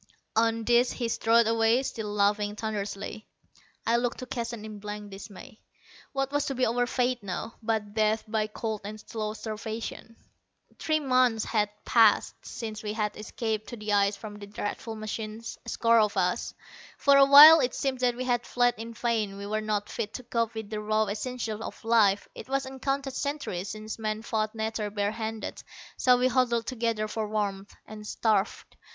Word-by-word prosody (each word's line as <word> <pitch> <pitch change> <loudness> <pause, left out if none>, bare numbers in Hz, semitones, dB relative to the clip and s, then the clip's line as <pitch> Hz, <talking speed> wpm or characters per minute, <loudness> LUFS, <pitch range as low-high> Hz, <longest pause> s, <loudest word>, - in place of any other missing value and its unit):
On 225 0 +2
this 240 +2 +3
he 240 - -2
strode 230 +1 +3
away, 225 +3 +3
still 220 -5 -4
laughing 205 0 +1
thunderously. 210 0 -4 0.6
I 230 +1 +3
looked 240 0 -1
to 255 - -6
Keston 235 -3 -5
in 215 -1 -8
blank 210 0 -7
dismay. 200 +2 -11 0.5
What 270 0 -1
was 290 0 0
to 275 - -2
be 255 0 +2
our 245 +2 +1
fate 250 -1 0
now, 200 +3 -5
but 215 -2 -1
death 215 0 +2
by 215 -1 0
cold 215 0 -4
and 215 +1 -7
slow 215 -1 -4
starvation! 220 +1 -6 0.6
Three 310 -1 +1
months 255 -5 +2
had 210 -2 +1 0.2
passed 225 -3 +4
since 220 -2 -6
we 210 -1 -3
had 210 -1 -2
escaped 215 0 -3
to 240 - -6
the 210 -1 -2
ice 200 0 +3
from 205 0 -9
the 205 - -9
dreadful 210 +2 -5
machines 215 +1 -6
a - - -3
score 230 0 +4
of 210 -2 +1
us. 180 +4 0 0.4
For 280 -1 +5
a 275 - +8
while 295 +4 +11
it 250 -3 0
seemed 265 -2 -1
that 245 -1 +2
we 250 - -3
had 245 -1 +1
fled 245 0 +3
in 230 0 -7
vain. 220 -4 -1
We 200 - -6
were 215 +1 -1
not 210 -1 -1
fit 210 - -4
to 255 - -6
cope 230 -1 -1
with 220 -1 -6
the 215 - -2
raw 215 +1 +1
essentials 220 +1 -4
of - - -8
life: 210 -4 +4
it - - -10
was 275 0 0
uncounted 270 +1 -3
centuries 265 -11 -3
since 215 +1 -6
man 215 0 -2
fought 215 -1 -1
nature 220 -1 -2
bare 205 0 -1
handed. 220 0 -5 0.3
So 250 -1 +4
we 250 +1 +3
huddled 240 -2 +1
together 230 -3 -1
for 215 0 -3
warmth, 200 -2 -3
and 210 -1 -9
starved. 215 -2 -1
220 Hz, 185 wpm, -28 LUFS, 210-240 Hz, 0.6 s, while